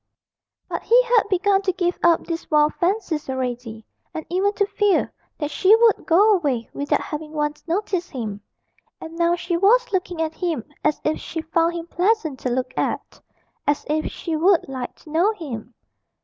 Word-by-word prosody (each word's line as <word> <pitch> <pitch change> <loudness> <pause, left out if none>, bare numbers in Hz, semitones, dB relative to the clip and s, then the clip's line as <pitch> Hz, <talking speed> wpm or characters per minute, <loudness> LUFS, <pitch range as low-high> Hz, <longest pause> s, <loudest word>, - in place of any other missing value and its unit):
But - - -4
he 475 +2 +5
had 475 -4 +2
begun 390 +1 +2
to 390 -1 +1
give 355 -1 -1
up 340 -1 +3
these 330 -1 -5
wild 300 -1 +3
fancies 350 -6 -1
already, 245 -4 -4 0.3
and 315 - -4
even 385 +3 +2
to 405 - +1
fear 410 -1 +1 0.2
that 295 0 -3
she 395 +7 +5
would 455 -1 +3
go 405 +6 +5
away 280 - 0
without 285 0 0
having 305 0 -6
once 295 -1 -2
noticed 360 0 -1
him; 215 -6 -5 0.6
and 325 0 -9
now 340 0 +2
she 345 0 -2
was 470 +7 +4
looking 360 -2 -1
at 320 -1 -1
him 330 - -2 0.2
as 300 0 +1
if 310 - 0
she 325 - -5
found 330 +1 +1
him 335 -1 -5
pleasant 355 -5 0
to 255 - -2
look 255 +1 -2
at, - - -3 0.5
as 290 0 +1
if 310 +1 0
she 330 -2 -4
would 345 +2 +3
like 260 -2 -5
to 305 - -14
know 355 +8 +3
him. 245 - -8
330 Hz, 180 wpm, -22 LUFS, 295-380 Hz, 0.6 s, he